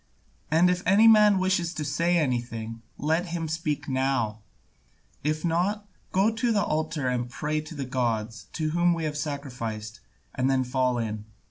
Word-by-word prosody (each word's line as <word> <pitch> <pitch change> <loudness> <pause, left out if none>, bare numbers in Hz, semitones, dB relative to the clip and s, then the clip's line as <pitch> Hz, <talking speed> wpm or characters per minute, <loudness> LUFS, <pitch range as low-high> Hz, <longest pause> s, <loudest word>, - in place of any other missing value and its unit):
And 165 +3 +5
if 180 0 -1
any 205 +5 +6
man 210 -2 +7
wishes 185 -2 0
to 150 - -3
say 170 +5 +1
anything, 120 -5 -2 0.2
let 160 +5 0
him 170 -1 -3
speak 150 -2 -2
now; 130 -5 0 0.8
if 155 +2 -1
not, 190 +5 0 0.2
go 200 +4 +3
to 230 +1 0
the 205 -2 +2
altar 155 -3 -1
and 125 -1 0
there - - -13
pray 150 +4 -2
to 155 +1 -10
the 140 -2 -3
gods 115 -3 -2
to 155 -1 -1
whom 175 +1 +3
we 165 - -3
have 150 -1 -2
sacrificed, 125 -6 -5 0.3
and 130 0 +1
then 130 -1 +2
fall 125 0 0
in. 110 -2 -3
150 Hz, 170 wpm, -27 LUFS, 125-175 Hz, 0.8 s, man